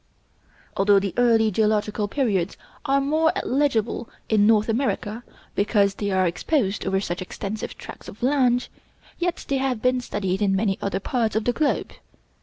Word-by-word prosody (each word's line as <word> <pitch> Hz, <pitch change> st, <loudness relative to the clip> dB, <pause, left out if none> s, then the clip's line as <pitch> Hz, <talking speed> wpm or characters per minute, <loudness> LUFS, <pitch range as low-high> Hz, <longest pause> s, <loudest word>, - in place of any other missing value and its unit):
Although 200 Hz, +1 st, +5 dB
the 195 Hz, -1 st, 0 dB
early 225 Hz, -3 st, +4 dB
geological 210 Hz, 0 st, +1 dB
periods 200 Hz, -7 st, 0 dB, 0.3 s
are 275 Hz, -1 st, +3 dB
more 310 Hz, +4 st, +2 dB
legible 240 Hz, -4 st, 0 dB, 0.2 s
in 210 Hz, -2 st, +4 dB
North 215 Hz, -1 st, +4 dB
America, 230 Hz, -2 st, -1 dB, 0.3 s
because 200 Hz, -1 st, +2 dB
they 205 Hz, +1 st, -3 dB
are 190 Hz, -1 st, +2 dB
exposed 200 Hz, -, 0 dB
over 190 Hz, 0 st, +1 dB
such 175 Hz, -2 st, -4 dB
extensive 200 Hz, +3 st, -5 dB
tracts -, -, -10 dB
of 215 Hz, -, -10 dB
land, 250 Hz, -2 st, +2 dB, 0.5 s
yet 350 Hz, 0 st, -2 dB
they 275 Hz, -, +1 dB
have 265 Hz, -3 st, -1 dB
been 250 Hz, +2 st, +1 dB
studied 195 Hz, -4 st, -2 dB
in 195 Hz, -2 st, +2 dB
many 195 Hz, -1 st, 0 dB
other 195 Hz, -1 st, -1 dB
parts 225 Hz, +1 st, -1 dB
of 220 Hz, -, +1 dB
the 245 Hz, -, +1 dB
globe. 290 Hz, +3 st, 0 dB
220 Hz, 160 wpm, -24 LUFS, 200-250 Hz, 0.5 s, Although